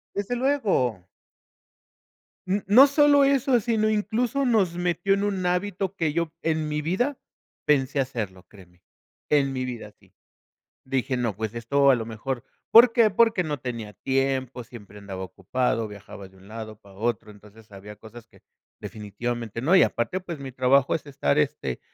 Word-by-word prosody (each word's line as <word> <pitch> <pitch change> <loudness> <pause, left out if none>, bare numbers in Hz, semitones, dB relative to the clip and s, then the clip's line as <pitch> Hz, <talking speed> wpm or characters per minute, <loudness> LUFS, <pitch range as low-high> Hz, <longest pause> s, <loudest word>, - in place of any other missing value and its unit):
Desde 205 +5 -2
luego. 195 - 0 1.4
N 195 +2 -1
no 245 +8 +8
solo 285 0 +4
eso, 270 -3 +3
sino, 220 -1 +1
incluso, 230 +5 0
nos 210 -9 +2
metió 175 +2 0
en 200 +1 -1
un 195 -3 -2
hábito 190 +1 -1
que 160 -4 0
yo 165 -1 -2
en 160 -1 -1
mi 150 0 -2
vida 245 - -1 0.5
pensé 140 -1 +2
hacerlo, 110 -9 -4
créeme, 90 -4 -18 0.5
en 140 -2 +2
mi 130 -1 -3
vida 120 -4 -7
sí. - - -26 0.7
Dije: 130 0 -1
"No, 115 -5 -1
pues 110 +1 -4
esto 140 +4 +2
a - - +6
lo 115 -2 -4
mejor, 115 +3 -5 0.3
¿por 230 +1 +8
qué?". 230 -3 +4
Porque 225 -2 +3
no 150 -2 -3
tenía 115 -4 -6
tiempo, 130 +1 -2
siempre 105 -4 -13
andaba 95 -2 -7
ocupado, 115 +3 -2
viajaba 100 -1 -11
de 95 - -22
un 95 +2 -18
lado 110 -1 -8
para 100 -1 -18
otro. 115 0 -2
Entonces 105 +1 -17
había 100 +2 -11
cosas 115 +2 -13
que - - -22 0.4
definitivamente 115 +2 -5
no. 160 +9 +2
Y - - +7
aparte, 180 +11 0
pues, 170 -4 -7
mi 135 -2 -8
trabajo 130 +2 +3
es 160 - -3
estar, 140 +1 0
este, 100 - -1
135 Hz, 165 wpm, -25 LUFS, -, 1.4 s, no